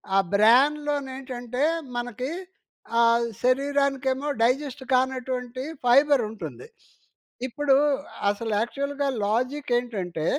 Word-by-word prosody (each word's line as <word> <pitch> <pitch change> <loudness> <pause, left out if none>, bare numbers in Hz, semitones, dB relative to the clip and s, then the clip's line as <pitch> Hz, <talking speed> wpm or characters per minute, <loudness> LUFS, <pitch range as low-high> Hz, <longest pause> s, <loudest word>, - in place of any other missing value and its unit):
ఆ - - +5 0.2
బ్రాన్‌లో 280 +8 +4
నేంటంటే 255 -1 -4 0.3
మనకి 245 +2 -4 0.7
ఆహ్, 235 0 +4 0.2
శరీరానికేమో 275 +1 +1
డైజెస్ట్ 265 +3 0
కానటువంటి 255 -1 -1 0.2
ఫైబర్ 275 +2 +5
ఉంటుంది. 225 - -8 0.8
ఇప్పుడు 275 +2 +2 0.5
అసలు 220 +2 -2
యాక్చువల్‌గా 280 +4 -2 0.2
లాజిక్ 255 +6 -1
ఏంటంటే, 190 -10 -3
255 Hz, 85 wpm, -25 LUFS, 235-280 Hz, 0.8 s, ఆ